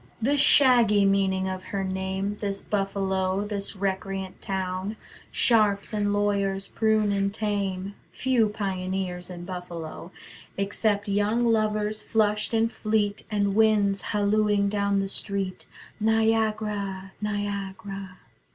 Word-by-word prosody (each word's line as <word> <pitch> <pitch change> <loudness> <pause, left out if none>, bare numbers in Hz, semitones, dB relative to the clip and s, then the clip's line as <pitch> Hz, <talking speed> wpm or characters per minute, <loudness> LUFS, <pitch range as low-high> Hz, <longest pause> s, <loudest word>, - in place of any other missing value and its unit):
The 265 +6 +2
shaggy 240 -7 +6
meaning 190 -1 +2
of 185 0 -5
her 195 0 -3
name 190 +2 -2
This 200 -1 -2
Buffalo, 195 -1 -1
this 205 -1 -4
recreant 190 -1 -3
town, 190 +2 -3 0.4
Sharps 210 -3 +2
and 205 -1 +1
lawyers 200 -1 0
prune 220 -1 +2
and 200 0 +1
tame: 200 -2 -2 0.2
Few 250 -4 +1
pioneers 185 -3 -3
in 175 -1 -7
Buffalo; 175 -2 -7 0.5
Except 200 +1 0
young 205 +4 +1
lovers 215 -1 +1
flushed 210 -1 +1
and 225 0 +2
fleet 215 -2 -1
And 205 -2 +1
winds 205 -2 +3
hallooing 205 0 +1
down 200 -1 +1
the 195 - -2
street: 195 -1 -3 0.3
"Niagara, 215 -3 0
Niagara." 200 -2 -4
200 Hz, 115 wpm, -26 LUFS, 195-215 Hz, 0.5 s, shaggy